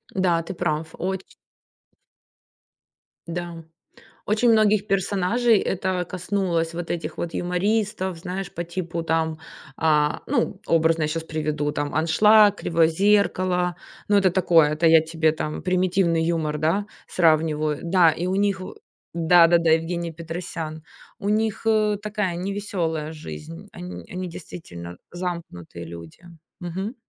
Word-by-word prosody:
Да, 175 -3 +2
ты 190 - -6
прав. 160 -2 -2
Оче 190 +1 -4 1.9
Да, 170 -1 -5 0.6
очень 220 +3 +3
многих 215 -1 +3
персонажей 200 +4 +2
это 185 -1 -1
коснулось, 180 -3 -1
вот 170 0 -5
этих 170 - -4
вот 170 - -4
юмористов, 190 0 -1
знаешь, 185 +2 -5
по 170 - -3
типу 170 -1 -4
там, 160 -1 0 0.4
а, 150 -1 +2
ну, - - -1
образно 165 -1 +2
я - - +1
щас 165 +1 -3
приведу 150 -2 -2
там 145 0 -3
"Аншлаг", 205 +6 +5
"Кривое 165 -4 +2
зеркало". 185 -1 +2 0.3
Ну, 205 0 +4
это 190 -3 +3
такое, 170 -4 +4
это 160 +2 +2
я 160 -1 +7
тебе 160 -1 +1
там 155 -1 -4
примитивный 180 -2 +1
юмор, 160 -3 -1
да, 165 +7 +1 0.2
сравниваю. 155 -3 +2
Да, 170 -1 +4
и 170 +3 -3
у 185 - 0
них 200 -1 +1
в 185 - -8 0.4
да, 170 +1 +6
да, 170 -1 +3
Евгений 170 +1 0
Петросян. 165 -1 -6 0.4
У 200 - -2
них 220 +1 0
ы 215 -1 +3
такая 210 -4 -2
невеселая 175 -5 -3
жизнь, 80 - -9
они 90 -1 -8
они 185 0 -4
действительно 90 - -9
замкнутые 170 - -6
люди. 85 - -11 0.4
Мгм. 190 +7 -5
170 Hz, 135 wpm, -23 LUFS, 160-190 Hz, 1.9 s, я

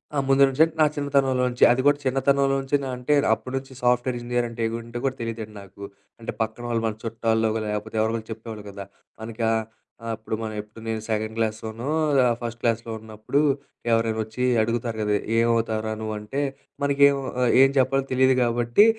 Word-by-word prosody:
ఆ! - - 0
ముందు 135 0 +6
నుంచే 135 +4 +4 0.2
నా 155 - +7
చిన్నతనంలోంచే, 135 -3 +1
అది 125 +2 +2
గూడా 145 0 +5
చిన్నతనంలోంచినా 135 +1 +1
అంటే 125 +4 0 0.2
అప్పడి 130 +4 -5
నుంచి 135 0 -7
సాఫ్ట్‌వేర్ 125 +1 +2
ఇంజినీర్ 120 0 -1
అంటే 115 0 -7 0.2
ఏంటే 120 +1 -6
గూడా 135 -1 0
తెలీదండి 115 -2 -5
నాకు. 100 +1 -13 0.4
అంటే 115 - -5
పక్కన 110 +2 -3
వాళ్ళు 115 -1 0
మన 110 -1 -1
చుట్టాల్లోగో 110 -1 0
లేకపోతే 105 +1 -4
ఎవరో 110 +1 +2
ఒకళ్ళు 110 -1 -4
చెప్పేవాళ్ళు 110 -1 -9
గదా! 100 0 -8 0.4
మనకా 110 0 -2 0.6
ఆహ్, 115 - -2
అప్పుడు 110 0 -4
మనం 110 -1 -4
ఎప్పుడు 105 +2 -15
నేను 110 -1 -2
సెకండ్ 110 0 -1
క్లాస్‌లోనో 110 +3 -3 0.4
ఆహ్, 120 -1 +2
ఫస్ట్ 120 0 -5
క్లాస్‌లో 115 0 0
ఉన్నప్పుడు 110 +5 -2 0.5
ఎవరైనొచ్చి 110 +1 0 0.2
అడుగుతారు 115 0 -2
గదా! 105 -1 +1 0.2
ఏమవుతావురా 115 -2 +1
నువ్వు? 110 0 -3
అంటే 120 +7 -3 0.4
మనకేమో 140 0 +4 0.2
ఆహ్, 120 - +3
ఏం 135 - +7
చెప్పాలో 135 +1 +2
తెలియదు 130 0 +4
గాబట్టి, 120 - +4
115 Hz, 165 wpm, -24 LUFS, 110-130 Hz, 0.6 s, నా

